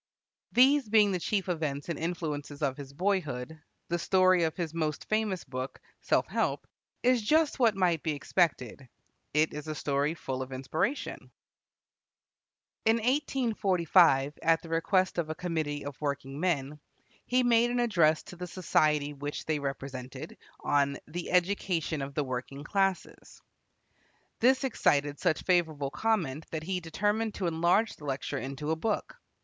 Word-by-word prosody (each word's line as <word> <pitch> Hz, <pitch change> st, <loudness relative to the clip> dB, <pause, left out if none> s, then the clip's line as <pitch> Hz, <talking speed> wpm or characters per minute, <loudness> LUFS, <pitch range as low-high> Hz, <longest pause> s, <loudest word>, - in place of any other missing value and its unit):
These 265 Hz, 0 st, +5 dB
being 210 Hz, -2 st, +5 dB
the 185 Hz, -, -1 dB
chief 195 Hz, +2 st, -1 dB
events 155 Hz, -5 st, -2 dB
and 170 Hz, -3 st, -3 dB
influences 155 Hz, -4 st, -4 dB
of 135 Hz, -2 st, +1 dB
his 140 Hz, -1 st, -9 dB
boyhood, 160 Hz, -4 st, -2 dB, 0.3 s
the 175 Hz, 0 st, -1 dB
story 185 Hz, -1 st, +4 dB
of 160 Hz, -, -3 dB
his 165 Hz, -3 st, -3 dB
most 155 Hz, -3 st, -2 dB
famous 215 Hz, -5 st, 0 dB
book, 130 Hz, 0 st, -6 dB, 0.2 s
"Self -, -, +1 dB
Help," -, -, -1 dB, 0.4 s
is 250 Hz, -1 st, +4 dB
just 305 Hz, +6 st, +2 dB
what 230 Hz, -5 st, +4 dB
might 175 Hz, -5 st, +2 dB
be 155 Hz, -, -1 dB
expected. 140 Hz, -, -1 dB, 0.5 s
It 155 Hz, +1 st, +3 dB
is 150 Hz, +1 st, -6 dB
a 155 Hz, -, -3 dB
story 145 Hz, +2 st, 0 dB
full 130 Hz, -4 st, -4 dB
of 130 Hz, 0 st, -6 dB
inspiration. 135 Hz, -, -3 dB, 1.5 s
In 225 Hz, 0 st, +4 dB
1845, 200 Hz, -, +2 dB
at 165 Hz, 0 st, +3 dB
the 165 Hz, -, -10 dB
request 180 Hz, +3 st, +1 dB
of 160 Hz, -2 st, -2 dB
a 155 Hz, -, -3 dB
committee 155 Hz, -5 st, -3 dB
of 145 Hz, -1 st, -7 dB
working 140 Hz, -1 st, -3 dB
men, 150 Hz, -4 st, -1 dB, 0.5 s
he 255 Hz, +1 st, +3 dB
made 240 Hz, 0 st, +4 dB
an 245 Hz, 0 st, 0 dB
address 170 Hz, -10 st, +3 dB
to -, -, -11 dB
the 180 Hz, +1 st, -6 dB
society 150 Hz, -5 st, +1 dB
which 145 Hz, +1 st, -5 dB
they 155 Hz, -2 st, 0 dB
represented, 135 Hz, 0 st, -6 dB, 0.3 s
on 140 Hz, -1 st, +1 dB
"The 170 Hz, +3 st, -5 dB
Education 175 Hz, -4 st, 0 dB
of 135 Hz, 0 st, -6 dB
the 150 Hz, -, +1 dB
Working 130 Hz, +2 st, -5 dB
Classes." 195 Hz, +2 st, -2 dB, 1.0 s
This 260 Hz, +3 st, +4 dB
excited 145 Hz, -, +1 dB
such 155 Hz, -, +1 dB
favorable 160 Hz, -6 st, +1 dB
comment 160 Hz, -5 st, -1 dB
that 160 Hz, -1 st, -4 dB
he 185 Hz, +2 st, -2 dB
determined 205 Hz, +6 st, -1 dB
to 190 Hz, -, -3 dB
enlarge 170 Hz, +6 st, +2 dB
the 150 Hz, -, -11 dB
lecture 140 Hz, 0 st, -3 dB
into 140 Hz, +4 st, -4 dB
a -, -, +2 dB
book. 210 Hz, +6 st, -2 dB
160 Hz, 155 wpm, -29 LUFS, 145-195 Hz, 1.5 s, These